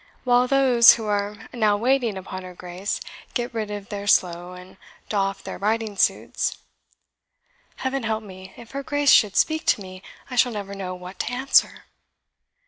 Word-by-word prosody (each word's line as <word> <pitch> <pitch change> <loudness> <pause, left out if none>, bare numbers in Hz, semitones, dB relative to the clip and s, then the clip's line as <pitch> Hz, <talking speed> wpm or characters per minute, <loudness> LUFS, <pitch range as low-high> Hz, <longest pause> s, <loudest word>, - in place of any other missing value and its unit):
while 245 0 +3
those 255 -3 +7
who 225 - -5
are 205 0 -1 0.2
now 215 -4 +2
waiting 240 -2 +1
upon 185 0 -7
her 180 -1 -10
Grace 180 +3 -5 0.3
get 240 -1 -2
rid 220 -2 -3
of 205 -1 -7
their 205 -1 -5
slough, 180 -1 +1
and 180 +1 -14 0.3
doff 195 -2 -1
their - - -7
riding 215 +1 -1
suits. - - 0 1.2
Heaven 265 +1 -2
help 220 -1 -2
me, 190 -2 -11
if 235 -1 -13
her 275 - -4
Grace 290 -1 +2
should 210 -3 +5
speak 315 0 +2
to - - +4
me, 185 0 -10 0.3
I 250 - -7
shall 245 0 +4
never 200 -2 -6
know 185 -2 -5
what 180 +1 -11
to - - -2
answer!" 265 +2 +2
210 Hz, 170 wpm, -23 LUFS, 190-245 Hz, 1.2 s, those